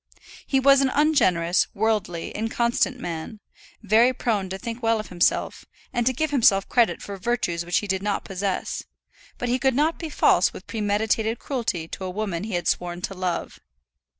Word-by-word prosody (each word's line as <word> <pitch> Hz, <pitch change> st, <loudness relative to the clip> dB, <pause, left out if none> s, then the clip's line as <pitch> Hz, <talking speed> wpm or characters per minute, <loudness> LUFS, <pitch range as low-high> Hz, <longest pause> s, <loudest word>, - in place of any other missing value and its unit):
He 270 Hz, -, +2 dB
was 275 Hz, +1 st, +6 dB
an 270 Hz, -, +2 dB
ungenerous, 185 Hz, -, +2 dB
worldly, 205 Hz, -5 st, -1 dB
inconstant 235 Hz, +3 st, 0 dB
man, 170 Hz, +2 st, -6 dB, 0.4 s
very 225 Hz, +5 st, +4 dB
prone 210 Hz, -6 st, -1 dB
to 190 Hz, -, -4 dB
think 230 Hz, +4 st, -6 dB
well 225 Hz, -1 st, +2 dB
of 215 Hz, -, -7 dB
himself, 175 Hz, -1 st, 0 dB, 0.3 s
and 240 Hz, -1 st, 0 dB
to -, -, +5 dB
give 305 Hz, +4 st, -2 dB
himself 200 Hz, -8 st, +4 dB
credit 240 Hz, -2 st, +2 dB
for 200 Hz, -1 st, -6 dB
virtues 180 Hz, -5 st, -1 dB
which 175 Hz, +1 st, 0 dB
he 205 Hz, -, -1 dB
did 190 Hz, -1 st, -1 dB
not 205 Hz, 0 st, -2 dB
possess; 195 Hz, 0 st, -3 dB, 0.6 s
but 245 Hz, -, -3 dB
he 250 Hz, +2 st, +1 dB
could 265 Hz, 0 st, +2 dB
not 310 Hz, +4 st, +1 dB
be 325 Hz, -, -5 dB
false -, -, +3 dB
with -, -, -10 dB
premeditated 220 Hz, +1 st, 0 dB
cruelty 220 Hz, -, -3 dB
to -, -, -7 dB
a 185 Hz, -, -3 dB
woman 190 Hz, -2 st, -3 dB
he 215 Hz, -4 st, -3 dB
had 175 Hz, -1 st, -2 dB
sworn 175 Hz, 0 st, -1 dB
to -, -, -3 dB
love. 185 Hz, -2 st, -3 dB
215 Hz, 180 wpm, -24 LUFS, 185-245 Hz, 0.6 s, was